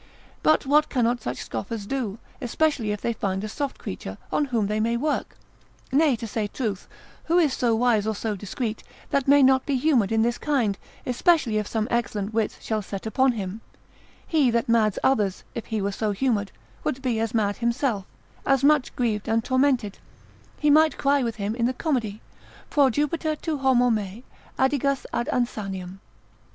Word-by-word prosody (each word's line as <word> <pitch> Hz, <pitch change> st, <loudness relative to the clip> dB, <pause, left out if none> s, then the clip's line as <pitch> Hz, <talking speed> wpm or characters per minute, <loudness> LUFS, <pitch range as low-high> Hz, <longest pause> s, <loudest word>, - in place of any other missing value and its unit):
But 310 Hz, -2 st, +3 dB
what 300 Hz, +3 st, +4 dB
cannot 240 Hz, -2 st, +1 dB
such 125 Hz, +1 st, -4 dB
scoffers 200 Hz, -, -5 dB
do, 230 Hz, -4 st, -3 dB, 0.2 s
especially 255 Hz, -3 st, 0 dB
if 210 Hz, -, -3 dB
they 235 Hz, -, 0 dB
find 195 Hz, -2 st, -2 dB
a -, -, -2 dB
soft 280 Hz, +5 st, -4 dB
creature, 95 Hz, +1 st, -6 dB
on 295 Hz, -, +2 dB
whom 235 Hz, -6 st, 0 dB
they 210 Hz, +2 st, -1 dB
may 230 Hz, +2 st, +1 dB
work? 295 Hz, +4 st, -2 dB, 0.5 s
nay, 285 Hz, 0 st, +4 dB
to 230 Hz, 0 st, -6 dB
say 215 Hz, -1 st, -2 dB
truth, 205 Hz, -4 st, -4 dB, 0.4 s
who 335 Hz, +2 st, +2 dB
is 310 Hz, -7 st, +3 dB
so 235 Hz, -3 st, +1 dB
wise, 225 Hz, -3 st, +2 dB
or 220 Hz, -, 0 dB
so 215 Hz, 0 st, -2 dB
discreet, 215 Hz, +3 st, -4 dB, 0.3 s
that 275 Hz, -1 st, +1 dB
may 285 Hz, 0 st, +6 dB
not 265 Hz, 0 st, +5 dB
be 280 Hz, -, +1 dB
humoured 250 Hz, -7 st, +2 dB
in 225 Hz, 0 st, +3 dB
this 240 Hz, +1 st, 0 dB
kind, 250 Hz, -9 st, +1 dB, 0.3 s
especially 250 Hz, -3 st, +2 dB
if 210 Hz, -, -3 dB
some 220 Hz, -1 st, -1 dB
excellent 220 Hz, -3 st, -1 dB
wits 220 Hz, -1 st, -1 dB
shall 215 Hz, -1 st, -1 dB
set 195 Hz, 0 st, -7 dB
upon 260 Hz, +4 st, +2 dB
him; 205 Hz, 0 st, -5 dB, 0.6 s
he 300 Hz, -6 st, +3 dB
that 235 Hz, -1 st, +1 dB
mads 220 Hz, -3 st, +3 dB
others, 210 Hz, -8 st, +1 dB
if 235 Hz, -, -6 dB
he 215 Hz, -3 st, -2 dB
were 200 Hz, -, 0 dB
so 210 Hz, +1 st, -1 dB
humoured, 205 Hz, -3 st, 0 dB, 0.3 s
would 265 Hz, +1 st, -2 dB
be 240 Hz, -4 st, 0 dB
as 225 Hz, 0 st, -1 dB
mad 205 Hz, -2 st, +1 dB
himself, 235 Hz, -4 st, 0 dB, 0.4 s
as 270 Hz, -1 st, +2 dB
much 290 Hz, -2 st, +3 dB
grieved 220 Hz, -4 st, -1 dB
and 225 Hz, 0 st, +2 dB
tormented; 255 Hz, -6 st, +1 dB, 0.6 s
he 295 Hz, -1 st, +3 dB
might 310 Hz, +1 st, +5 dB
cry 280 Hz, 0 st, +2 dB
with 230 Hz, -3 st, -2 dB
him 205 Hz, 0 st, -2 dB
in 235 Hz, 0 st, +1 dB
the 255 Hz, -, -1 dB
comedy, 245 Hz, -8 st, -2 dB, 0.5 s
Proh 280 Hz, -3 st, +5 dB
Jupiter 300 Hz, +4 st, 0 dB
tu 305 Hz, -1 st, -3 dB
homo 250 Hz, -2 st, +4 dB
me, 210 Hz, +1 st, -3 dB, 0.3 s
adigas 275 Hz, 0 st, +1 dB
ad 240 Hz, -, -1 dB
insaniam. 195 Hz, -6 st, -3 dB
235 Hz, 185 wpm, -25 LUFS, 210-270 Hz, 0.6 s, may